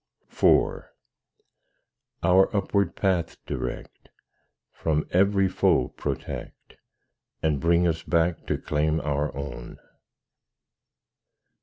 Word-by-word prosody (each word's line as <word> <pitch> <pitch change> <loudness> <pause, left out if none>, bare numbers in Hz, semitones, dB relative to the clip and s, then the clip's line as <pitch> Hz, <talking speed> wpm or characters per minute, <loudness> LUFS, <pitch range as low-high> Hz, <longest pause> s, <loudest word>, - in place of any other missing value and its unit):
IV - - +2 1.4
Our 95 +2 +5
upward 100 -2 0
path 90 -4 0
direct, - - -6 0.6
From 75 -1 -1
every 95 +1 +3
foe 65 -8 +2
protect, - - -6 0.7
And 75 -3 +1
bring 85 +1 +3
us 80 -1 -1
back 85 -1 0
to - - 0
claim 75 +1 0
our 75 0 -1
own. 70 -4 -7
85 Hz, 90 wpm, -25 LUFS, 75-95 Hz, 1.4 s, Our